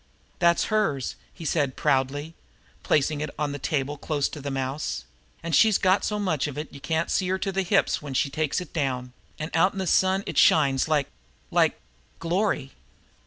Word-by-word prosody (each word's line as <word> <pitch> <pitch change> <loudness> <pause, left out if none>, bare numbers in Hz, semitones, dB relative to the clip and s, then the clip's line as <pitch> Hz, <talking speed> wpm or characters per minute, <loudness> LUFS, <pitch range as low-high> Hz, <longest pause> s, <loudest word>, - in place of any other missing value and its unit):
"That 170 -1 +4
HERS," 200 - 0 0.2
he 165 - -10
said 140 -4 0
proudly, 145 +2 0 0.5
placing 150 0 +1
it 150 - -2
on 150 -1 -1
the 145 - -5
table 145 +1 -1
close 145 -3 0
to 150 - -8
the 140 - -4
mouse. 135 - -3 0.4
"An' 170 - -3
she's 210 +7 +5
got 185 +1 +3
so 210 - -1
much 170 -9 0
of 145 -1 -7
it 150 +1 -6
you 140 - -9
can't 160 +3 -1
see 185 - +1
her 190 +1 +1
to 195 +1 -2
the 195 0 0
hips 195 +2 +2
when 140 -3 -6
she 140 - +1
takes 155 0 0
it 180 - -9
down; 125 -5 -2 0.2
an' 155 0 -5
out 175 +4 +3
in - - -9
the 190 - -1
sun 190 +2 +3
it - - 0
shines 140 -3 +4
like 150 -3 +2 0.5
like - - +2 0.4
glory!" 165 -5 -1
155 Hz, 195 wpm, -26 LUFS, 140-180 Hz, 0.5 s, she's